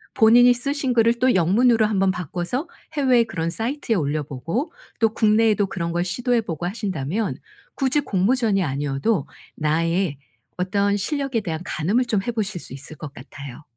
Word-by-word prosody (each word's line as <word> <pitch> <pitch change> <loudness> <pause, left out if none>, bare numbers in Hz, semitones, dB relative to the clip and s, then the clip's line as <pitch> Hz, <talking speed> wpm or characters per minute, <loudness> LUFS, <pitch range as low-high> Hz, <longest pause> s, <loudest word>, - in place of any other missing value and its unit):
본인이 245 +2 +7
쓰신 270 +1 -1
글을 230 0 +3
또 255 +1 +4
영문으로 220 +6 +4
한번 195 -3 +2
바꿔서 180 - -3 0.3
해외에 260 -5 +4
그런 165 -7 -3
사이트에 230 - -2
올려보고 155 - -2 0.3
또 225 -1 +2
국내에도 215 -2 +3
그런 170 -3 -3
걸 175 0 +1
시도해 240 +6 0
보고 170 -6 -5
하신다면 195 -1 -2 0.4
굳이 270 +1 +1
공모전이 210 -2 +1
아니어도 140 +5 -1 0.3
나의 165 +1 0 0.4
어떤 200 +2 +1
실력에 275 +3 -1
대한 165 -6 -4
가늠을 190 +10 0
좀 215 -5 0
해 240 - -3
보실 210 -6 -2
수 130 - -7
있을 140 +3 -8
것 145 -2 -8
같아요. 140 +2 -10
200 Hz, 350 characters per minute, -22 LUFS, 165-235 Hz, 0.4 s, 본인이